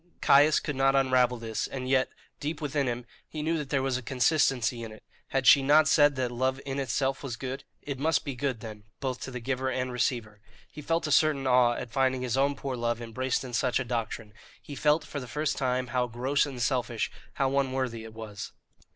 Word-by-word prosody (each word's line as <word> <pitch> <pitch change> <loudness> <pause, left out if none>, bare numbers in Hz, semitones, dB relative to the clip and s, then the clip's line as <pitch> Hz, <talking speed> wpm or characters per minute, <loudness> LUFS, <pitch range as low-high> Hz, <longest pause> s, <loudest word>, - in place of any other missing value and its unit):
Caius 145 +2 +5
could 150 - -4
not 135 +1 +3
unravel 130 -2 +3
this, 115 -1 -3
and 130 -1 -5
yet, 130 0 +2 0.3
deep 150 +1 -3
within 145 -2 -1
him, 120 0 -3 0.2
he 155 -1 -5
knew 165 +2 +1
that 145 -2 -5
there 135 -2 +1
was 130 -1 -1
consistency 125 -2 +1
in 115 -1 -6
it. 110 - -13 0.2
Had 135 -1 -1
she 140 - +8
not 150 +3 +5
said 145 0 +5
that 125 -2 -1
love 130 +2 0
in 135 0 -3
itself 135 +1 -1
was 135 -4 -4
good? 130 +3 -6 0.2
it 140 -2 -5
must 160 +3 +1
be 140 - -3
good, 130 -3 -2
then, 110 -2 -9
both 130 -2 -3
to - - -6
the 125 -1 -5
giver 130 +2 -2
and 130 0 -2
receiver. 115 -4 -2 0.3
He 150 - -9
felt 165 +3 0
a 150 - -2
certain 150 -2 +3
awe 125 -2 +4
at 120 -1 -6
finding 130 -1 +1
his 125 -2 -1
own 140 +1 +2
poor 135 -2 -4
love 120 -1 -1
embraced 125 +3 -2
in 125 -2 -8
such 125 +1 +1
a 130 - -2
doctrine; 115 -3 -4 0.3
he 145 - -10
felt 150 +2 +2
for 145 - -5
the 125 - -8
first 150 +4 -1
time 130 -2 0
how 125 -1 +1
gross 130 +5 0
and 135 -3 -7
selfish, 120 -2 -1 0.2
how 135 0 +1
unworthy, 130 -4 -2
it 110 -1 -11
was. 105 -3 -7
130 Hz, 220 wpm, -28 LUFS, 120-140 Hz, 0.3 s, she